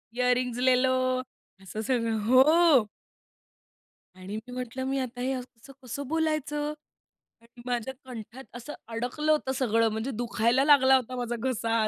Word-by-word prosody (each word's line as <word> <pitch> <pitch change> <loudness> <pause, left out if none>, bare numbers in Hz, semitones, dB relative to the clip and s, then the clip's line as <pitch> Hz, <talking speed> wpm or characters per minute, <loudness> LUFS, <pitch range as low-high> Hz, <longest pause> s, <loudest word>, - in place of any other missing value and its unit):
Earring 250 -1 +1
लेलो, 255 0 +4 0.7
असं 195 +3 -6
सगळं 230 -1 0
हो. 275 0 +5 1.3
आणि 185 +2 -8
मी - - -10
म्हंटलं 250 +1 -5
मी 270 +1 -1
आता 250 -1 -5
हे 260 +2 -1
असं 255 -1 -4
कसं, 250 +5 -15
कसं 255 +3 -6
बोलायचं 300 -1 -1 0.7
आणि 235 +1 -17
माझ्या 245 +1 -2
कंठात 240 0 -9
असं 245 +5 -7
अडकलं 245 +7 -1
होतं 300 -4 +1
सगळं, 230 -3 +2
म्हणजे 220 +5 -3
दुखायला 240 +2 +1
लागला 265 -3 +6
होता 255 -1 -1
माझा 240 -1 -3
घसा. 230 -3 0
250 Hz, 140 wpm, -27 LUFS, 230-265 Hz, 1.3 s, लागला